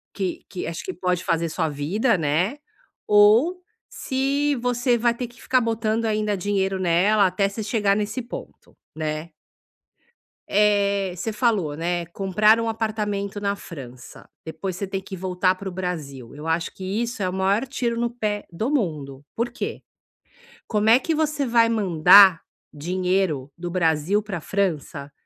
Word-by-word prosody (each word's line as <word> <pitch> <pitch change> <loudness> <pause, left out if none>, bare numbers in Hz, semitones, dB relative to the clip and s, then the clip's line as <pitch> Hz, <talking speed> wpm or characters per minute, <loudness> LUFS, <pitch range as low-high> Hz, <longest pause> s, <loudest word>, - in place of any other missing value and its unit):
que 190 -3 -3
que, 185 - -5
acho 165 - -5
que 375 - -4
pode 180 - -1
fazer 165 0 0
sua 160 0 -1
vida, 185 - 0
né, 165 - 0 0.5
ou 220 - +5 0.3
se 280 +2 0
você 245 0 +1
vai 235 +1 +2
ter 245 +1 -5
que 240 +1 -18
ficar 255 - +2
botando 225 0 -1
ainda 210 -2 0
dinheiro 195 0 -1
nela 190 +4 +3
até 195 +2 0
você 200 +3 -6
chegar 210 -2 +1
nesse 210 +4 -2
ponto, 240 - -10 0.2
né. 155 +1 -4 1.2
Eh, 200 -2 +2
você 210 +5 -4
falou, 210 - 0
né, 170 +2 -2
comprar 200 +5 +3
um 230 0 -1
apartamento 210 -2 -3
na 200 0 0
França, 135 -11 -11 0.2
depois 185 +3 -5
você 200 - -3
ter 195 0 -4
que 190 0 -8
voltar 185 0 +1
pro 190 0 -6
Brasil, 155 -10 -5
eu 150 +2 -9
acho 165 +1 -1
que 190 - -9 0.2
isso 235 -3 -3
é - - +1
o - - -5
maior 195 +5 +1
tiro 240 -3 -2
no 235 0 0
pé 210 -4 -3
do 215 +9 -2
mundo, 150 - -2
por 235 +1 -1
que? 240 - -5 0.9
Como 215 0 0
é 230 +2 +7
que 320 +5 -2
você 305 -2 0
vai 230 -1 +4
mandar 190 -3 +6 0.3
dinheiro 180 -3 -1
do 175 +1 -5
Brasil 170 +3 +1
pra 200 -4 -5
França, 155 -7 -2
200 Hz, 160 wpm, -23 LUFS, 175-225 Hz, 1.2 s, é